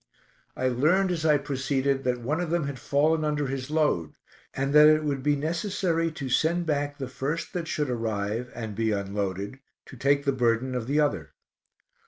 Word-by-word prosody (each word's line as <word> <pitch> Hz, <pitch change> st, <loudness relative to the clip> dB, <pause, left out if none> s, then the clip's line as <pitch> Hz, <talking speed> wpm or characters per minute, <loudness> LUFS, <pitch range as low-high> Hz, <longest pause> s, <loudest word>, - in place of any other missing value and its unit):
I 130 Hz, -, +1 dB
learned, 160 Hz, +10 st, +2 dB
as 160 Hz, -2 st, -1 dB
I 150 Hz, -1 st, +5 dB
proceeded, 135 Hz, 0 st, -1 dB
that 125 Hz, -1 st, 0 dB
one 150 Hz, +8 st, -1 dB
of 175 Hz, -, -2 dB
them 170 Hz, -1 st, +1 dB
had 140 Hz, -2 st, -5 dB
fallen 155 Hz, +3 st, +2 dB
under 150 Hz, -1 st, 0 dB
his 135 Hz, 0 st, -4 dB
load, 150 Hz, -, +1 dB, 0.4 s
and 135 Hz, +1 st, -2 dB
that 150 Hz, 0 st, +8 dB
it 155 Hz, 0 st, +4 dB
would 140 Hz, -3 st, -1 dB
be 145 Hz, +2 st, +2 dB
necessary 165 Hz, +2 st, -1 dB
to 135 Hz, -4 st, -5 dB
send 170 Hz, +7 st, +1 dB
back 145 Hz, -2 st, -1 dB
the 135 Hz, -2 st, -4 dB
first 140 Hz, +5 st, -4 dB
that 170 Hz, -2 st, -3 dB
should 150 Hz, -3 st, -1 dB
arrive 115 Hz, +1 st, -2 dB
and 110 Hz, -3 st, -5 dB
be 110 Hz, +2 st, 0 dB
unloaded, 100 Hz, +2 st, -3 dB, 0.3 s
to -, -, -12 dB
take 140 Hz, +1 st, +1 dB
the 140 Hz, -, +3 dB
burden 125 Hz, 0 st, +1 dB
of 125 Hz, -2 st, -3 dB
the 145 Hz, +3 st, +1 dB
other. 100 Hz, -, 0 dB
140 Hz, 190 wpm, -27 LUFS, 125-155 Hz, 0.4 s, that